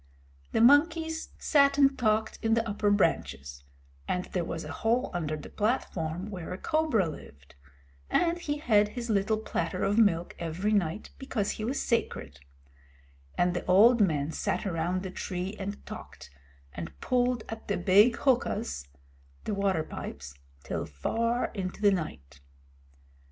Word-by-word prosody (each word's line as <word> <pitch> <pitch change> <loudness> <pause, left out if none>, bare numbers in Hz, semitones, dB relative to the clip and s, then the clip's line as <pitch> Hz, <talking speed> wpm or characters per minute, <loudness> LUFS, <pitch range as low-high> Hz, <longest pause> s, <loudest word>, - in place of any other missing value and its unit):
The - - +2
monkeys 320 +5 +4
sat 280 -2 +3
and 275 -1 +5
talked 220 -2 0
in 225 0 +2
the 230 0 0
upper 205 0 0
branches, 70 - 0 0.4
and 180 0 -1
there 180 - 0
was 165 0 -4
a 155 - -7
hole 235 +8 0
under 155 -3 -2
the 150 - -10
platform 190 -5 -2
where 180 -4 -6
a 180 - -4
cobra 305 - +1
lived, 70 - -11 0.6
and 345 0 +2
he 295 -4 -2
had 210 -8 +3
his 235 +1 -4
little 205 +1 +2
platter 185 -4 -2
of 205 +3 +2
milk 175 -6 +2
every 170 +5 -2
night 190 -1 -1
because 230 -6 -2
he 215 - -5
was 260 +5 -1
sacred; 75 - -2 1.0
and 175 0 +2
the 175 - -3
old 220 +6 +6
men 155 -6 +1
sat - - -2
around 180 0 -1
the 190 - -5
tree 185 +2 -4
and 200 +1 -6
talked, 65 - -10 0.4
and 80 -5 -7
pulled 245 -2 +1
at 225 0 -8
the 200 - 0
big 205 +6 +5
huqas 235 - 0 0.6
(the 215 - -2
water 195 -5 +1
pipes) 70 - -7 0.3
till - - -3
far 230 - -1
into 190 -3 -4
the 205 -1 +5
night. 70 - -5
200 Hz, 150 wpm, -29 LUFS, 165-230 Hz, 1.0 s, old